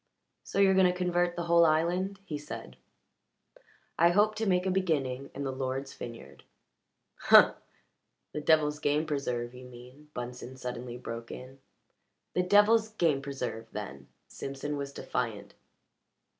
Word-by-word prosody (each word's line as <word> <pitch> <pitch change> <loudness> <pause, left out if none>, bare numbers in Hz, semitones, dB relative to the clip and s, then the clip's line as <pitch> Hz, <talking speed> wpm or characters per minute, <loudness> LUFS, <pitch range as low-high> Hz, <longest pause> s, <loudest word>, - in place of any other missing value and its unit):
"So - - -6
you're 195 -1 +6
going 190 -1 +5
to 180 - -6
convert 175 -1 +1
the 175 - -3
whole 170 0 +5
island?" 175 +5 +1
he 150 -6 -4
said. 150 - -8 1.2
"I 170 +1 +6
hope 205 +4 +3
to 220 0 -1
make 180 -1 +2
a 190 - +1
beginning 140 -8 -1
in 140 - -4
the 135 - -2
Lord's 130 +1 -3
vineyard." 115 - -10 0.8
"Humph! - - +7 0.8
The 150 - -3
devil's 150 -1 +3
game 150 +1 +1
preserve, 125 -5 -2
you 125 0 -11
mean," 125 +4 -14
Bunsen 125 +1 -6
suddenly 125 -1 -6
broke 115 -1 -7
in. 130 +2 -9 0.7
"The 180 - +2
devil's 210 +4 +5
game 165 -10 +1
preserve, 125 -5 -5
then!" 70 -10 -7 0.2
Simpson 140 +2 -5
was 140 -1 -4
defiant. - - -4
145 Hz, 145 wpm, -30 LUFS, 125-175 Hz, 1.2 s, Humph